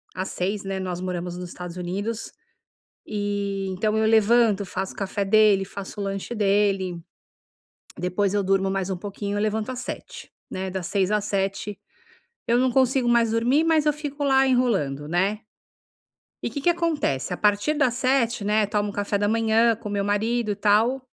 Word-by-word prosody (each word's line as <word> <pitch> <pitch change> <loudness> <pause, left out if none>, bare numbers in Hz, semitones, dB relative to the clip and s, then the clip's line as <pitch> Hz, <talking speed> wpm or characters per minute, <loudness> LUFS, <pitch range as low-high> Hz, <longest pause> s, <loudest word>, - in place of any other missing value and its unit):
às 185 +1 -3
6h00, 200 +3 -2
né, 195 0 -3
nós 180 -1 -4
moramos 180 -1 -4
nos 180 -1 -6
Estados 180 -1 -8
Unidos, 200 +5 -4 0.7
e 200 -1 -2
então 215 +3 0
eu 220 - +2
levanto, 220 -1 +4
faço 190 +1 -4
o - - -20
café 200 0 -2
dele, 205 -1 +4
faço 200 +1 -8
o - - -2
lanche 195 +3 -4
dele. 195 -4 +1 1.0
Depois 185 +2 0
eu 205 -1 +1
durmo 195 0 +1
mais 195 -1 -1
um 190 - -2
pouquinho, 200 +2 -5
eu 205 - 0
levanto 215 +1 -1
às 255 -1 -5
7h00, 470 - -8 0.2
né, 190 0 -4
das 185 -2 -4
6h00 195 -1 0
às 210 -1 0
7h00 195 +1 -2 0.7
eu 235 +1 +3
não 255 0 +3
consigo 260 0 +2
mais 235 -2 +3
dormir, 245 +7 +2
mas 320 -2 +2
eu 300 - +4
fico 290 -1 -6
lá 270 -1 +4
enrolando, 195 - +1
né. 190 +5 +1 1.1
E - - -1
que 285 - -5
que 345 +5 +3
acontece, 315 - -1
a - - -4
partir 210 +9 +2
das 270 -5 +2
7h00, 240 -4 +1
né, 210 +1 +2
tomo 205 0 -1
café 205 0 -2
da 205 - +1
manhã 225 +1 +3
com 215 -1 -8
meu 200 -1 -1
marido 215 +3 0
e 205 - -2
tal. 215 +6 +3
205 Hz, 180 wpm, -24 LUFS, 195-235 Hz, 1.1 s, levanto